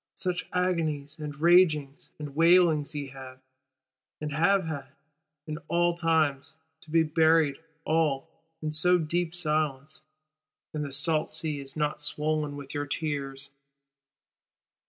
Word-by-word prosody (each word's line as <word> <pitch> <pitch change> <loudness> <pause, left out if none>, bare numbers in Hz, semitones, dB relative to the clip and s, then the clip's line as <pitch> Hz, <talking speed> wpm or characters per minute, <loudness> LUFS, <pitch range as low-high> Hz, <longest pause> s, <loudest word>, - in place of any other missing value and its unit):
Such 180 -1 -2
agonies 160 -5 -1
and 150 -1 -6
ragings 160 -5 +3
and 145 -2 -7
wailings 165 -2 +4
ye 145 -2 -4
have, 130 -1 -10 0.8
and 150 -1 -4
have 195 +5 +3
had, 150 -4 -5 0.6
in 155 0 -5
all 175 0 +2
times:—to 160 -1 -2
be 165 +1 +4
buried 160 -2 +3 0.3
all, 155 -4 +1 0.4
in 155 - -1
so 180 +4 +3
deep 170 +1 -1
silence; 155 -3 -1 0.7
and 150 -1 -2
the 140 - -5
salt 155 +3 +2
sea 150 -3 0
is 135 +1 -4
not 150 0 -1
swoln 150 0 -1
with 140 -1 -8
your 145 0 -3
tears. 135 -2 -3
155 Hz, 125 wpm, -28 LUFS, 145-165 Hz, 0.8 s, wailings